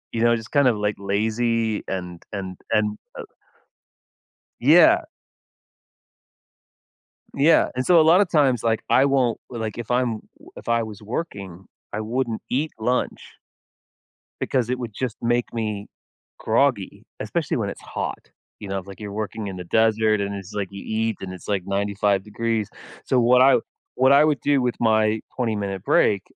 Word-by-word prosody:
You 115 - -1
know? 120 0 +4
Just 110 - -12
kinda, 140 -3 +4
like, 105 0 0
lazy 110 +2 0
and 90 -2 -5 0.2
and 95 -2 -6 0.2
and, 105 0 +3 0.3
uh - - -6 1.4
Yeah. - - +6 2.3
Yeah, 155 +4 +4
and 130 +1 -1
so 175 -2 +6
a - - +7
lotta 175 +6 +5
times, 140 -8 +2
like, 115 -1 0
I 135 - +5
won't 130 -4 +1
l 120 - -5
like, 110 -1 -4
if 120 -1 -7
I'm 120 -3 0 0.2
w - - -16
if - - -10
I 115 0 +2
was 110 -3 -8
working, 100 - -6 0.3
I 105 - -3
wouldn't 115 +1 -2
eat 150 +5 -1
lunch 125 +3 -2 1.1
because 125 -3 0
it 125 - -1
would 120 -3 -5
just 125 +1 -4
make 120 +1 0
me 105 -3 -3 0.5
groggy, - - 0 0.2
especially - - -2
when - - -1
it's - - -9
hot. - - -6 0.3
You 100 - -8
know? 95 - -2
If 95 0 -9
like 100 - -10
you're 105 -1 -6
working 110 0 -4
in 95 -2 -5
the 90 - -6
desert, 110 +2 +2
and 100 0 -2
it's 100 0 -8
like 100 -2 -2
you 100 - -8
eat, 110 0 -1
and 95 -1 -5
it's 90 - -12
like 100 -3 0
95 100 0 0
degrees. 110 0 -2 0.4
So 130 - +3
what 125 +2 +5
I 135 +1 +6 0.4
what 130 +1 +4
I 145 +2 +6
would 150 -2 +1
do 145 -2 +3
with 125 -1 0
my 110 -1 +2 0.2
twenty-minute 105 -6 -2
break 100 -3 +3
110 Hz, 170 wpm, -23 LUFS, 100-125 Hz, 2.3 s, a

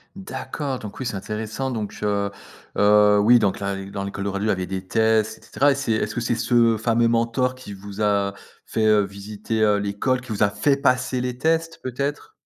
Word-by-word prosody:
D'accord 145 -8 -5
donc 105 -2 -9
oui, - - -3
c'est 110 - -2
intéressant 110 +6 -4
donc 110 -4 -5
heu 100 -1 0 0.5
heu, 105 0 +5
oui, 120 +3 +6
donc 100 -4 +1
là, 100 0 -2
et 95 - -6
dans 100 - -4
l'école 100 0 -5
de 100 - -1
radio, 100 +2 -2
il - - +1
y - - +4
avait 95 -1 -1
des 95 0 -5
tests 110 0 +2
et - - -22
cetera, 145 +1 +2
et - - -5
c'est 140 -4 -2
est-ce 110 - -1
que 120 - -1
c'est 120 0 0
ce 115 -1 +3
fameux 115 +1 +2
mentor 120 +2 +1
qui 130 -6 -10
vous 100 +2 -8
a 100 -1 +1 0.3
fait, 110 -1 -1
heu, 105 -1 +5
visiter, 105 +3 -4
heu, 105 -1 +4
l'école, 105 +6 -1
qui 125 - -10
vous 105 - -3
a 100 - +4
fait 140 +6 +1
passer 125 -1 +1
les 125 0 -3
tests, 165 +2 0
peut-être? 140 - -3
110 Hz, 225 wpm, -23 LUFS, 100-125 Hz, 0.5 s, oui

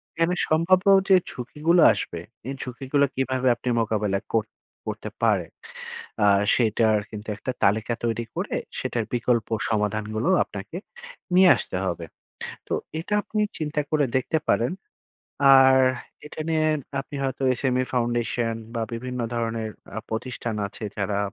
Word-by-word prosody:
এখানে 165 +2 +1
সম্ভাব্য 180 +5 +3 0.2
যে 190 - +8 0.2
ঝুঁকিগুলো 155 +7 +1
আসবে - - -4 0.3
এই 135 - -2
ঝুঁকিগুলা 135 +3 0
কীভাবে 130 -1 0
আপনি 125 - -4
মোকাবেলা 105 -3 0
কর 110 -2 +2 0.4
করতে - - -4
পারেন? - - +2 0.7
আ - - +6 0.3
সেটার 110 -2 +3
কিন্তু 105 0 -8
একটা 130 - -3
তালিকা 110 +3 +2
তৈরি 115 0 -1
করে - - -2 0.2
সেটার 115 - -1
বিকল্প 120 -2 +1 0.2
সমাধানগুলো 110 - -1
আপনাকে, 100 - -8 0.6
নিয়ে 185 -1 +7
আসতে - - -4
হবে, 85 -2 -3 0.6
তো - - -2 0.3
এটা 175 - -4
আপনি 215 - -2 0.2
চিন্তা 150 -1 -1
করে 150 -2 +3
দেখতে 145 +5 0
পারেন, 120 +9 +2 0.8
আর 135 0 +7 0.5
এটা 150 - -9
নিয়ে 155 -1 +2 0.3
আপনি 145 +1 -8
হয়তো 135 0 -2 0.2
SME 130 -1 +1
foundation 120 -1 0 0.2
বা 115 - -1
বিভিন্ন 125 +1 -4
ধরনের 115 -1 -2 0.3
আ - - 0
প্রতিষ্ঠান 120 0 -3
আছে 105 +2 -8
যারা 100 0 -1
120 Hz, 135 wpm, -25 LUFS, 110-140 Hz, 0.8 s, যে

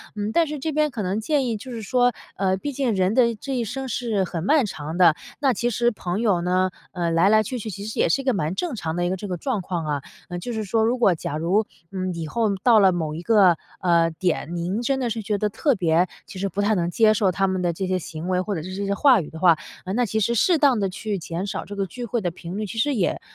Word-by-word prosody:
嗯， 210 +1 -2
但 335 +3 +3
是 300 0 -4
这 315 +3 -3
边 305 0 +2
可 230 -6 -4
能 190 +3 -1
建 280 +4 +1
议 230 -2 -1
就 255 +5 -9
是 230 -2 -5
说， 245 +3 +2 0.2
呃， 190 -1 +1
毕 285 +9 -4
竟 260 -5 0
人 190 +1 +2
的 235 -1 +3
这 265 +5 -5
一 240 - 0
生 265 +4 -4
是 225 -4 -1
很 170 -2 -4
漫 290 +3 +3
长 160 -3 -5
的， 170 -4 +6 0.2
那 275 -3 +3
其 240 +2 0
实 240 +1 +1
朋 185 -3 -3
友 200 -7 +2
呢， 185 +1 +1 0.2
呃， 170 -2 -1
来 170 +4 +4
来 215 0 +5
去 250 +4 -4
去 220 - -5
其 200 0 -7
实 220 - -5
也 - - +3
是 275 - +2
一 - - -10
个 260 - +3
蛮 185 -3 -1
正 345 - -2
常 160 -6 -3
的 175 0 0
一 - - 0
个 185 - 0
这 205 - -6
个 180 -2 -3
状 230 -1 -2
况 175 -2 -3
啊， 145 -2 -1 0.3
呃， 175 0 -4
就 245 - -5
是 220 -1 -2
说 220 +2 +1
如 240 +3 +1
果 230 -7 +4
假 155 -2 -4
如， 185 +7 +1 0.3
嗯， 185 -1 -3
以 165 -1 -4
后 215 +2 0
到 235 -3 +6
了 195 -2 +6
某 160 -4 -2
一 165 - -5
个， 190 -4 +5 0.2
呃， 170 -2 +3
点， 175 0 -2
您 180 +7 -2
真 270 +3 0
的 245 - -1
是 225 0 -3
觉 205 0 -1
得 210 +1 0
特 270 +6 +1
别 175 -2 +2 0.2
其 185 - -9
实 195 - 0
不 205 - -2
太 210 +2 +2
能 175 -2 0
接 215 +3 +4
受 205 -2 +2
他 195 +2 +1
们 185 -1 -1
的 175 -1 0
这 190 +3 -3
些 185 - +1
行 160 +1 -7
为， 180 -1 +2
或 200 +1 -3
者 160 - -3
是 185 +2 -7
这 200 +1 -3
些 200 - 0
话 260 +1 +5
语 150 - -8
的 160 - -9
话， 170 -3 +5 0.3
呃， 185 - -4
那 245 +1 +2
其 220 +1 -1
实 235 +3 +1
适 335 - +4
当 275 -6 +4
地 195 - +1
去 200 +2 -3
减 170 +1 -4
少 - - -4
这 205 - -8
个 200 -1 -1
聚 240 +6 -7
会 235 +1 -2
的 175 -3 -1
频 175 +2 -7
率， 215 - -2
其 220 +3 -7
实 280 +6 +2
也 195 -6 0
200 Hz, 315 characters per minute, -23 LUFS, 180-235 Hz, 0.3 s, 的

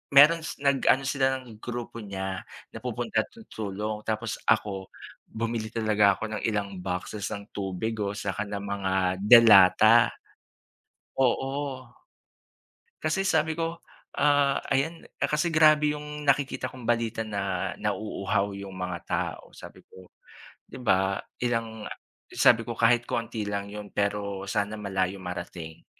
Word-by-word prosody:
meron 150 +4 +8 0.2
nag-ano 135 -1 +3
sila 135 -1 +1
ng 115 -4 -14
grupo 120 -1 -6
niya 95 -2 -4 0.3
napupunta 120 -2 -2 0.3
tulong 105 0 -4
tapos 110 0 -2
ako 100 -3 +1 0.4
bumili 115 0 -3
talaga 105 -3 +3
ako - - -7
ng - - -6
ilang 100 -3 -2
boxes 90 +3 -4
ng 100 0 -8
tubig 100 +3 -3
o 100 -1 -1
saka 100 0 -3
ng 100 -1 -5
mga 100 -2 -2 0.3
delata. 110 0 +7 1.1
Oo. 135 +1 0 1.1
Kasi 160 +5 0
sabi 160 -4 +1
ko, 165 +1 -3 0.4
ah, 145 -1 +3 0.2
ayan 160 +5 -1 0.2
kasi 150 +3 +1
grabe 155 -1 +5
'yung 150 0 -7
nakikita 140 0 +1
kong 130 - -11
balita 115 -1 0
na 100 -4 -2
nauuhaw 100 -1 -1
'yung 100 -1 -8
mga 90 -1 -4
tao, - - -3
sabi - - -12
ko 95 -1 -15 0.6
'di - - -9
ba, 95 -3 +2 0.2
ilang 115 -3 -2 0.4
sabi 115 -1 +5
ko 120 - -2
kahit 120 +1 +4
konti 115 -1 -2
lang 100 0 -3
'yun 105 -1 -7
pero 100 -1 -2
sana 105 +2 -1
malayo 95 -2 -1
marating. 85 -3 -7
110 Hz, 125 wpm, -27 LUFS, 100-130 Hz, 1.1 s, meron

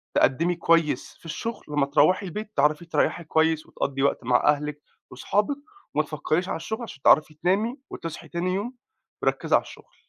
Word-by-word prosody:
تقدمي 165 +7 +3
كويّس 165 -2 +1
في - - -22
الشغل، 225 +8 -5
لمّا 145 -1 +2
تروحي 155 +8 +3
البيت 210 +4 -6
تعرفي 150 +3 +2
تريحي 170 0 0
كويّس 160 0 +1
وتقضي 135 -1 -2
وقت 140 - +1
مع 125 +1 +3
أهلِك 150 0 +1 0.3
وأصحابِِك 210 +8 0 0.4
وما 155 - +3
تفكريش 155 +4 -1
على - - -1
الشغل 220 +8 -5
عشان 220 - -8
تعرفي 155 +3 +5
تنامي 195 - 0
وتصحي 165 -2 -7
تاني 180 +1 -2
يوم 215 +7 -3 0.5
مـرَكِزَة - - +2
على - - +3
الشغل. - - -15
160 Hz, 165 wpm, -25 LUFS, 150-185 Hz, 0.5 s, تعرفي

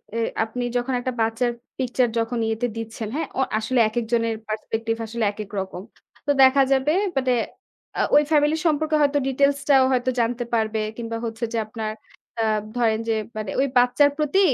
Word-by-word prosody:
এ - - -1 0.3
আপনি 235 +3 -4
যখন 245 +2 -1
একটা 255 +1 -2
বাচ্চার 225 +2 +1 0.3
picture 250 -1 +1
যখন 230 +1 -1
ইয়েতে 225 +2 -1
দিচ্ছেন, 225 0 -5
হ্যাঁ? 320 - -2
অ - - +4 0.2
আসলে 240 +3 0
একেকজনের 230 0 0
perspective 225 +1 -3
আসলে 225 +1 -3
একেক 210 -1 -8
রকম। 190 -1 -5 0.4
তো - - +4
দেখা 265 +1 +6
যাবে 270 +2 +3 0.3
মানে 260 -1 +2 0.6
আ - - +2
ওই 295 - +8
family 295 0 +4
সম্পর্কে 310 -1 +2
হয়তো 290 0 +3
details 280 +1 +2
টাও 270 -2 +6
হয়তো 255 0 +1
জানতে 240 +1 0
পারবে। 220 -1 +1 0.2
কিংবা 230 -1 -4
হচ্ছে 225 +1 -5
যে - - 0
আপনার 215 0 -4 0.5
অ্যা 220 - +2 0.3
ধরেন 225 -2 +2
যে 225 - +2 0.2
মানে 215 -3 -3
ওই 275 - +3
বাচ্চার 250 +4 +5
প্রতি 305 +5 +1
240 Hz, 175 wpm, -23 LUFS, 225-265 Hz, 0.6 s, ওই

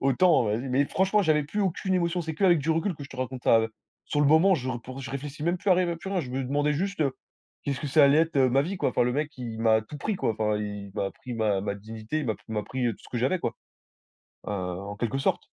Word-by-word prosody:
autant, 135 +1 +4
heu, 105 - +1
vas-y» 130 +3 -4
mais 140 +3 +3
franchement 195 +3 +2
j'avais 155 -3 +3
plus 205 +8 -3
aucune 190 0 0
émotion. 175 0 +1
C'est 160 -1 -4
qu'avec 175 -2 +4
du 155 +3 -1
recul 165 +3 +1
que 145 - -9
je - - -11
te 130 - -11
raconte 130 0 -4
ça, 115 - +5
heu, 110 0 -3 0.3
sur 145 - -1
le 145 - +4
moment, 165 +6 +6
je 130 -4 -3
r 120 -2 -3
pour 130 +2 -8
je 135 0 -6
réfléchis 140 +2 -6
même 170 +2 +1
plus 200 - 0
à - - +8
rêver 175 -1 +1
à - - -5
plus 180 +3 -8
rien. 190 -3 +1
Je 125 -5 -7
me 130 0 -2
demandais 145 +3 +1
juste: 190 +4 -2
«Heu, 140 -4 +1 0.5
qu'est-ce 140 -2 -2
que 150 - -3
ça 145 +1 +6
allait 140 +2 +5
être, 165 -2 +1
heu, 130 -1 +5
ma 135 +3 +3
vie, 185 +5 -3
quoi». 130 - 0
Enfin - - +2
le 125 0 +1
mec, 150 +2 -2
il 115 -3 -6
m'a 110 -1 +4
tout 145 +7 -9
pris, 215 +8 -1
quoi. 115 - 0
Enfin, 105 -1 0
il 105 -2 -5
m'a 100 - -1
pris 125 -2 -8
ma 105 -4 +1
ma 100 0 -2
dignité, 110 +7 -5
il 140 - -4
m'a 110 - 0
p - - -26
m'a 105 -1 -2
pris, 130 +1 -2
heu, 115 - +1
tout - - -15
ce - - -13
que 120 - -2
j'avais, 135 +10 +1
quoi, 115 - -2 0.9
heu, - - -3
en 100 +1 -4
quelque 120 +4 -1
sorte. - - 0
135 Hz, 300 wpm, -27 LUFS, 115-160 Hz, 0.9 s, à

